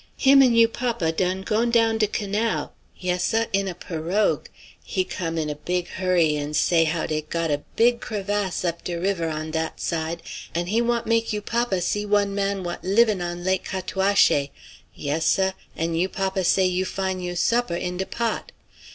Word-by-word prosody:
Him 275 0 +6
an' 250 -3 +5
you 230 0 +7
papa 230 -8 -1
done 185 +3 -1
gone 225 +3 +1
down 225 -1 +3
de 215 - +3
canal. 210 +2 -1 0.2
Yes, 180 -1 -1
seh; 225 +1 +2
in 195 0 +1
a 180 - -4
pirogue. 175 +4 -1 0.4
He 185 - -1
come 165 -2 -4
in 155 -1 -1
a 150 - -2
big 175 +4 -3
hurry 175 -4 +2
an' 145 +1 -3
say 165 +1 +3
how 160 +1 -1
dey 155 -1 -1
got 165 +1 -2
a 145 0 0
big 235 +1 +3
crevasse 205 -3 -2
up 170 -1 -2
de 175 - -3
river 175 -3 0
on 155 0 -4
dat 160 0 -3
side, 165 0 -2 0.3
an' 170 +1 0
he 215 +6 +1
want 235 0 0
make 230 0 +1
you 210 - -1
papa 230 -4 0
see 205 +4 0
one 205 -1 +1
man 200 -1 -1
what 175 0 -5
livin' 210 0 +3
on 175 0 -4
Lac 190 +1 +1
Cataouaché. 190 -6 +2 0.5
Yes, 150 +3 -1
seh. 190 0 +3 0.2
An 165 +1 -1
you 175 +3 +1
papa 190 0 -1
say 190 +2 +3
you 185 0 +1
fine 190 0 -2
you 175 -1 -4
supper 235 +1 +1
in 180 +1 -3
de 190 - -2
pot. 235 -1 -2
185 Hz, 195 wpm, -24 LUFS, 170-210 Hz, 0.5 s, you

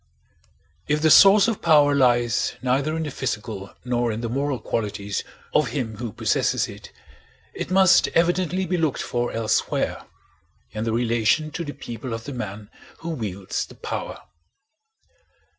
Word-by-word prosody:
If 150 0 +1
the 160 - +5
source 200 +5 +8
of 225 -3 -2
power 150 -3 +5
lies 120 -4 +2
neither 140 +5 0
in 160 - -2
the 150 - -4
physical 105 -5 -5
nor 120 -1 0
in 110 +1 -4
the 115 - -3
moral 140 +2 -1
qualities 105 -3 -3 0.3
of 150 -3 +3
him 115 -3 -4
who 120 -1 -5
possesses - - 0
it, - - -11 0.6
it - - -5
must 190 0 +5
evidently 180 +2 +1
be 180 +1 -1
looked 160 -5 0
for 120 0 -2
elsewhere—in 110 -1 -4
the 115 - 0
relation 120 +6 +1
to 170 - -4
the 145 -2 -6
people 115 0 -6
of 115 - -8
the 145 - -7
man 105 -3 -6 0.3
who 165 - -5
wields 100 - -4
the - - -14
power. - - -5
125 Hz, 150 wpm, -23 LUFS, 115-155 Hz, 0.6 s, source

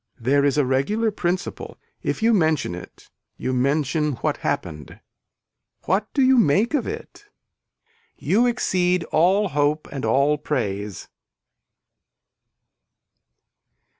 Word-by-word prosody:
There 140 +4 +2
is 140 0 +2
a 145 - +3
regular 205 - 0
principle, 180 -2 -3 0.2
if - - -3
you 230 +1 +4
mention 160 - +1
it 90 - -11 0.3
you 130 - -3
mention 145 +3 0
what 120 - -2
happened. 75 -1 -4 0.9
What 200 +5 0
do 275 - +3
you 260 0 +5
make 205 - +2
of 290 - 0
it. 435 -1 -8 0.9
You 235 +5 +2
exceed 180 -7 +1
all 190 +5 +3
hope 150 +1 0
and 135 -3 -5
all 140 +6 +2
praise. 105 - -3
155 Hz, 110 wpm, -22 LUFS, 135-210 Hz, 0.9 s, you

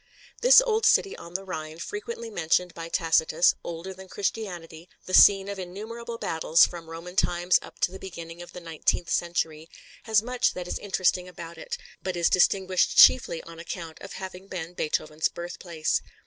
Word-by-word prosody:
This - - +8
old 450 -1 +1
city 395 - +3
on 170 +1 -12
the 195 - -2
Rhine, 160 -4 -6
frequently 225 +5 -6
mentioned 175 -1 0
by 165 0 -7
Tacitus, 165 0 +3
older 170 +3 -6
than 190 0 -12
Christianity, 180 -5 -5 0.2
the 185 - -7
scene 195 0 +7
of 200 -1 -5
innumerable 225 +6 -7
battles 160 -4 +3
from 170 -2 -9
Roman 165 +2 -8
times 175 -1 +2
up - - -13
to - - +2
the 190 - -9
beginning 170 -2 -9
of 175 - -10
the 180 - -9
nineteenth 165 +1 -1
century, 165 -2 -1 0.4
has 220 -2 +3
much 250 +1 0
that 180 -1 -5
is - - -3
interesting 185 -2 0
about 170 -2 -10
it, - - -5 0.2
but 185 -1 -3
is 170 - +2
distinguished 185 0 +2
chiefly 170 -10 +6
on 165 0 -12
account 165 -1 -7
of 195 - -9
having 190 0 -8
been 175 -3 -6
Beethoven's 155 -1 -1
birthplace. 170 -2 -3
180 Hz, 175 wpm, -26 LUFS, 165-195 Hz, 0.4 s, This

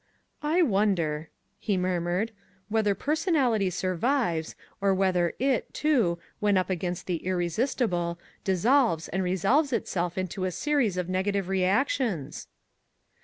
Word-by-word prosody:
"I 320 +4 +3
wonder," 180 - +1 0.3
he 200 -3 0
murmured, 180 +3 0 0.4
"whether 210 -2 +2
personality 280 - +1
survives 185 - 0 0.3
or 195 -1 +3
whether 185 -3 +1
it, 265 -1 0
too, 240 - +2 0.2
when 205 -2 +3
up 185 +1 0
against 180 -1 -3
the 180 -2 -1
irresistible, 175 - -1 0.3
dissolves 200 - +2
and 190 - -1
resolves 195 - +2
itself 180 -6 -2
into 185 0 -2
a 185 - -1
series 245 - 0
of 180 -1 -1
negative 190 +1 -1
reactions?" 195 - 0
190 Hz, 120 wpm, -27 LUFS, 175-240 Hz, 0.4 s, I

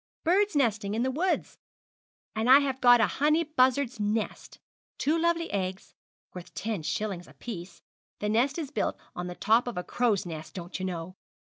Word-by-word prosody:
'Bird's 385 +2 +2
nesting 215 -6 +1
in 230 - +1
the 260 - 0
woods, 350 +7 -1 0.8
and 220 +3 0
I 265 - +10
have 265 -2 -2
got 245 -1 +7
a 225 - +5 0.2
honey 305 +3 +4
buzzard's 260 -4 +2
nest 210 +1 -2 0.4
two 300 +3 +1
lovely 335 0 +1
eggs, 190 -1 -3 0.4
worth 180 -1 -9
ten 215 -5 -2
shillings 185 +1 -3
apiece 175 -6 -9 0.3
the 210 - -3
nest 240 +8 +2
is 300 -4 -4
built - - -1 0.2
on 180 0 -4
the 180 - -6
top 225 +6 +3
of 240 - -4
a 180 - -2
crow's 225 -4 0
nest, 160 0 -7
don't 175 0 -6
you 185 - -2
know. 180 +1 -6
225 Hz, 175 wpm, -28 LUFS, 185-280 Hz, 0.8 s, I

